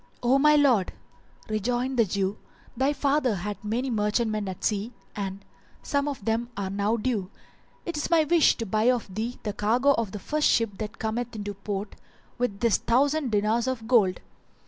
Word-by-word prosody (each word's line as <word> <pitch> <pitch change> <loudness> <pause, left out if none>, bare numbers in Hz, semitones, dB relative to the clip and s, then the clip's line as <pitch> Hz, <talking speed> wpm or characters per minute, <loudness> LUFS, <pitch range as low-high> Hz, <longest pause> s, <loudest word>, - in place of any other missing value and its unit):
"O 255 +3 +4
my 300 +1 +6
lord," 255 -10 +3 0.5
rejoined 245 +4 -1
the 230 - +6
Jew, 195 0 0
[FN#398] 210 - -18 0.4
"thy 265 +4 +1
father 280 -5 +1
had 205 +3 -5
many 240 +5 -1
merchantmen 215 -1 0
at 185 - -8
sea 210 +2 0 0.2
and, 195 -1 -5 0.4
as - - -11
some 285 0 +1
of 270 -8 -5
them 230 +2 0
are 195 -1 -3
now 205 +3 0
due, 210 -5 -1 0.6
it 340 -3 -3
is 295 - -2
my 330 -2 +5
wish 330 +1 +4
to 230 - -3
buy 215 +2 0
of 235 -6 -1
thee 225 +5 -3
the 210 - -2
cargo 240 +8 +2
of 230 -7 0
the 210 - -5
first 300 +9 0
ship 225 -4 +1
that 215 +1 -5
cometh 230 +2 -3
into 205 -1 -4
port 200 +1 -5 0.5
with 245 -5 -1
this 235 -3 +4
thousand 280 +4 +1
dinars 220 +3 +1
of 240 -4 -3
gold." 210 -7 +3
225 Hz, 190 wpm, -26 LUFS, 205-255 Hz, 0.6 s, my